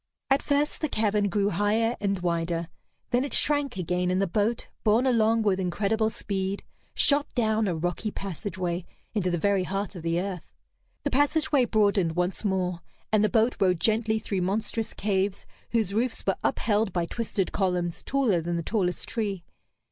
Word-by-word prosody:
At 270 - +4
first 290 +1 +1
the 310 - 0
cavern 210 -3 +1
grew 200 +1 +1
higher 220 +4 +1
and 200 -1 +1
wider; 170 -1 -1 0.4
then 245 +1 +3
it 280 - -1
shrank 290 -6 +1
again, 180 0 0
and 185 +1 +1
the 195 - +3
boat, 210 +5 0 0.2
borne 220 +4 +3
along 225 -3 +3
with 195 -3 +2
incredible 205 +4 +1
speed, 195 -2 -3 0.3
shot 285 0 +4
down 220 -3 +2
a 180 - 0
rocky 175 +6 -2
passageway 185 -2 -4 0.3
into 195 -5 0
the 175 - 0
very 200 +2 +2
heart 195 +2 -3
of 175 - -6
the 165 +1 0
earth. 185 -3 -5 0.5
The - - -1
passageway 290 -1 +3
broadened 200 -7 +2
once 180 +4 -1
more, 185 -3 0 0.3
and 215 -1 +5
the 215 - +3
boat 225 +4 +2
rode 180 -4 +3
gently 220 +1 +2
through 200 -3 -2
monstrous 215 +4 -1
caves 195 -1 0 0.2
whose 220 -5 0
roofs 235 +3 0
were 195 - +1
upheld 215 -1 +1
by 175 -1 0
twisted 205 -1 -2
columns 180 -3 -1
taller 250 -11 +1
than 170 +1 -2
the 170 - -2
tallest 180 -2 -1
tree. 205 -6 -2
200 Hz, 170 wpm, -27 LUFS, 180-225 Hz, 0.5 s, and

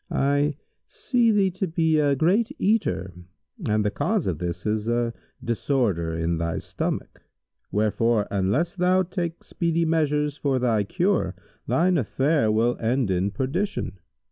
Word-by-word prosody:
I 145 +1 +1 0.3
see 240 -3 +1
thee 200 -3 +3
to 190 +2 -2
be 160 -1 +2
a 145 -2 +3
great 210 - +2
eater 95 - 0 0.6
and 105 0 +2
the 105 - +1
cause 210 - 0
of 85 -5 -2
this 90 +1 -4
is 105 0 -1
a 120 0 0 0.3
disorder 110 - 0
in 85 0 -1
thy 85 0 -1
stomach; - - -4 0.5
wherefore 110 +1 +1
unless 100 - 0
thou 185 +1 +3
take 175 -2 -4
speedy 170 -1 0
measures 150 -2 +1
for 140 -3 0
thy 115 -5 +1
cure, 185 - 0 0.3
thine 180 0 +3
affair 135 0 +1
will 115 +3 +2
end 120 -2 0
in 95 +2 +1
perdition." 135 - -2
135 Hz, 145 wpm, -25 LUFS, 105-170 Hz, 0.6 s, thee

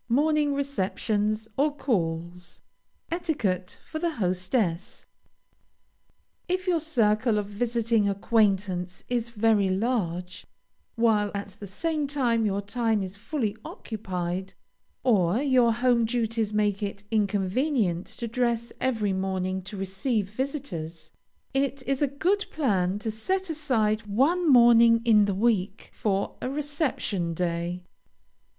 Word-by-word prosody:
MORNING 295 +3 +2
RECEPTIONS 215 -4 -1
OR 290 +1 +2
CALLS. 175 - -3 0.5
ETIQUETTE 225 - -1
FOR 315 - -5
THE 335 -1 -1
HOSTESS. 185 -1 -1 1.4
If 370 +1 -1
your 355 -3 +2
circle 230 -7 +2
of 205 - 0
visiting 225 0 0
acquaintance 195 -3 0
is 240 -1 -1
very 215 -3 +2
large, 185 -4 -2 0.5
while 220 -3 +3
at 200 0 -4
the 205 - -7
same 305 - -2
time 240 -6 +1
your 200 0 -1
time 220 -1 0
is 190 +1 -6
fully 215 0 -2
occupied, 185 -3 -5 0.5
or 200 -6 +3
your 260 -4 +4
home 240 0 +2
duties 225 -2 -1
make 210 -1 +1
it 200 -1 -4
inconvenient 205 - 0
to 235 - -6
dress 235 0 -1
every 220 -6 0
morning 190 0 -2
to 195 +2 -9
receive 195 +2 -2
visitors, 210 - -5 0.4
it 270 0 0
is 275 0 -1
a 290 - +4
good 365 +9 0
plan 200 - +1
to 220 +1 -3
set 375 - -2
aside 225 -9 0
one 295 - +2
morning 235 -2 +6
in 215 -3 +6
the 200 -2 -1
week 205 -2 0
for 200 -2 -1
a 255 - -2
reception 275 - -2
day. 175 +1 -2
220 Hz, 120 wpm, -26 LUFS, 195-260 Hz, 1.4 s, morning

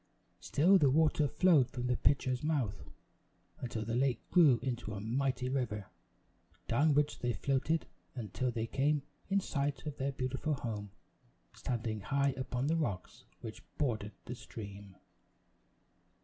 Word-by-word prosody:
Still 185 +7 +4
the 145 - +5
water 150 +1 +3
flowed 150 -5 +4
from 125 -1 -4
the 125 0 +2
pitcher's 130 -1 +2
mouth, 135 -11 -1 0.7
until 115 -3 -3
the 115 - -3
lake 130 +1 +1
grew 155 -9 +7
into 120 -5 -3
a - - -4
mighty 125 +4 0
river, 120 -7 -2 0.8
down 145 +5 +3
which 150 0 +2
they 120 -1 0
floated 140 +5 0 0.3
until 120 +2 -2
they 115 -2 -2
came 140 +4 +1 0.3
in 200 0 +3
sight 145 -6 -2
of 150 -2 -5
their 135 +1 -1
beautiful 135 +3 -1
home, 105 -5 -4 0.6
standing 110 -4 -3
high 140 +5 +1
upon 130 0 -2
the 160 +3 +2
rocks 115 - -3 0.2
which 110 -2 -7 0.2
bordered 110 -7 -1
the 120 - -5
stream. 100 -5 -9
130 Hz, 140 wpm, -33 LUFS, 115-145 Hz, 0.8 s, grew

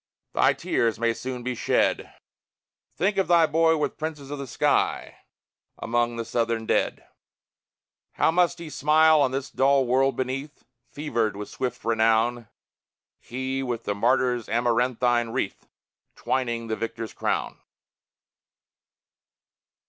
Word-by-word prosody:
Thy - - +4
tears 115 -2 0
may 115 0 +1
soon 125 +1 -6
be 125 +1 -2
shed; 120 - 0 0.8
Think 195 +3 0
of 195 - +2
thy 170 -2 +5
boy 160 +1 +3
with 150 - -2
princes 150 -3 -5
of 145 - -5
the 140 - -6
sky - - 0 0.6
Among 120 0 0
the 115 0 -4
Southern 115 -1 -1
dead! - - 0 1.1
How - - +2
must 175 +1 +2
he 170 -2 -8
smile 155 +2 +4
on 135 - +3
this 135 +1 -4
dull 135 0 +3
world 135 +2 +2
beneath, 135 +3 -4 0.3
Fevered 115 -8 -2
with 105 0 -7
swift 125 -2 -4
renown, 115 +1 +2 0.7
He, 130 +2 -4
with 125 -3 -3
the 100 - -1
martyr's 125 +2 +1
amaranthine 120 +1 +1
wreath - - -3 0.5
Twining 120 -3 -2
the 110 -1 -2
victor's 115 -1 -5
crown! - - -2
125 Hz, 125 wpm, -25 LUFS, 115-140 Hz, 1.1 s, thy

